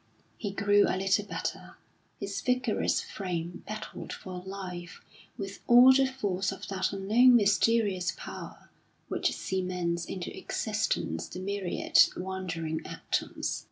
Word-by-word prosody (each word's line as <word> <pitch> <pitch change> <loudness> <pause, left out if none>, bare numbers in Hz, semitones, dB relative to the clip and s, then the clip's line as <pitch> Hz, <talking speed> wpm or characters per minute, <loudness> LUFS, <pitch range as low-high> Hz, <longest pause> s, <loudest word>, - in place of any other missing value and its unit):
He 210 - -4
grew 205 +1 +4
a - - 0
little 195 +1 +2
better; - - -5 0.4
his 200 -1 -4
vigorous 250 -3 +1
frame 175 -3 -5
battled 215 0 -6
for 180 -1 -7
life 180 -2 -7 0.3
with 200 -2 -6
all 245 +2 +9
the 270 0 +4
force 200 -8 -1
of 195 - -8
that 190 -1 0
unknown 220 +6 +5
mysterious 205 -3 +3
power - - -9 0.4
which - - 0
cements 180 -2 -2
into 185 -2 -5
existence 80 0 -2
the 180 - -7
myriad 195 -1 0 0.2
wandering 175 -4 -3
atoms. - - -3
195 Hz, 125 wpm, -29 LUFS, 180-210 Hz, 0.4 s, all